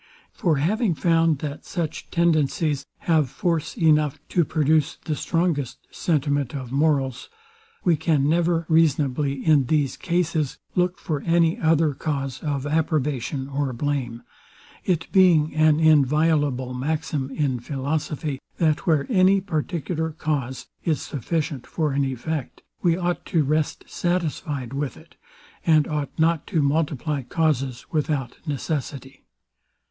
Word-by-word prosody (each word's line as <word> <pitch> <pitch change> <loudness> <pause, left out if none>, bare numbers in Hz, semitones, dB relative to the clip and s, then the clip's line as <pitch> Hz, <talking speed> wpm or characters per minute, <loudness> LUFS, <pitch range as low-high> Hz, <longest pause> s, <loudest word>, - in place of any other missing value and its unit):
For 165 -4 +1
having 195 - +1
found, 165 -1 +3
that 145 -1 -5
such 165 -4 -4
tendencies 155 -3 +1
have 155 -5 +2
force 165 - -2
enough 155 -5 +3
to 175 - +3
produce 155 -1 +1
the 155 - -1
strongest 150 -6 -1
sentiment 145 -4 0
of 130 -3 -6
morals, 135 -3 +1 0.5
we 175 -3 +4
can 145 -3 +2
never 165 +1 +2
reasonably, 145 -3 +1
in 150 -5 +4
these 145 -3 +1
cases, 170 -5 -1 0.2
look 180 0 +1
for 150 -4 -3
any 170 +1 +2
other 160 -1 +3
cause 135 -2 -3
of 140 -3 -2
approbation 145 -3 -1
or 140 -1 -2
blame; 125 -3 -2 0.6
it 170 -3 +1
being 175 -6 +5
an 155 0 +4
inviolable 150 -3 +3
maxim 145 +1 -2
in 135 -3 -1
philosophy, 145 +2 -3 0.2
that 155 -1 +1
where 155 -4 +3
any 195 -3 +4
particular 160 -2 -2
cause 140 -5 -3 0.2
is 155 -4 +1
sufficient 150 -1 -3
for 155 -3 -1
an 140 +1 +1
effect, 135 +2 -4 0.2
we 170 -2 +3
ought 175 -1 -1
to 160 -3 +2
rest 150 +2 0
satisfied 150 -7 -2
with 140 0 -3
it, - - -18 0.5
and 155 -2 +4
ought 150 -3 -2
not 165 -1 +2
to 160 -7 +1
multiply 145 0 0
causes 135 -3 -1
without 150 -5 -1
necessity. 140 -2 -4
150 Hz, 130 wpm, -24 LUFS, 140-165 Hz, 0.6 s, being